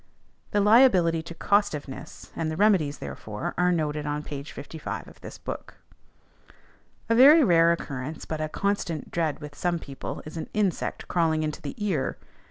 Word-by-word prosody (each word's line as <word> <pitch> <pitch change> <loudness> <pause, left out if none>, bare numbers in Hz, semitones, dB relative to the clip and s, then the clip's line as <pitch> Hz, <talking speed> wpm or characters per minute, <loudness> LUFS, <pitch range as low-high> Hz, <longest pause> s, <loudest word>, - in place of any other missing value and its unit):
The 205 - +2
liability 200 -7 +5
to 170 +1 -9
costiveness, 165 -10 -1
and 160 -1 -1
the 155 - -4
remedies 185 -8 +3
therefor, 105 -1 -5
are 180 0 +3
noted 150 -3 -1
on 150 0 -2
p. 145 -2 -6
55 145 +2 -7
of - - -16
this - - -9
book. - - -7 1.3
A 230 - +2
very 290 +7 +8
rare 170 -6 +5
occurrence, 145 -2 -4
but 155 -1 -4
a 155 - -2
constant 190 -4 -2
dread 160 -4 0
with 150 -1 -8
some 175 +3 -1
people, 140 -4 -7
is 155 +2 -8
an 160 - -5
insect 205 -4 -1
crawling 160 -3 +1
into 155 -1 -3
the - - -6
ear. 195 - -1
165 Hz, 165 wpm, -26 LUFS, 150-200 Hz, 1.3 s, very